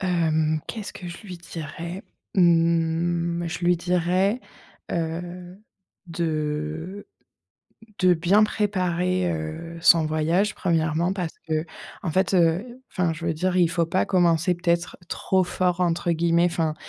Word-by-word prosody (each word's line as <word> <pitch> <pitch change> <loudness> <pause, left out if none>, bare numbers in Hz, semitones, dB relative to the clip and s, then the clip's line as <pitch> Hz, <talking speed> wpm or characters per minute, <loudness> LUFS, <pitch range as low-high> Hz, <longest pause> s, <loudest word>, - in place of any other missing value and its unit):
Hem, 160 -4 +1
qu'est-ce 215 -3 -5
que 180 - -9
je 170 - -9
lui 185 -2 -7
dirais? 170 +2 -7 0.3
Mmh, 170 0 +2
je 165 - -4
lui 175 0 +4
dirais, 180 +5 +1 0.5
heu, 175 +2 -4 0.5
de 160 +2 -3 0.9
de 185 -1 +5
bien 175 +6 +4
préparer, 185 -4 0
heu, 160 +1 -5
son 165 -1 +6
voyage. 165 +7 +1
1°, 165 0 +1
parce 180 -4 -3
qu'en 160 +2 -4
fait, 190 +4 +1
heu 190 +9 +1
enfin 175 -3 0
je 165 +1 -7
veux 165 - +1
dire 180 +3 -1
il 175 -2 +4
faut 170 0 +1
pas 175 +3 +1
commencer 175 -1 +3
peut-être 170 0 -1
«trop 190 +1 +1
fort» 180 0 0
entre 175 0 +1
guillemets 170 +1 +3
enfin 165 -3 0
170 Hz, 130 wpm, -24 LUFS, 165-180 Hz, 0.9 s, son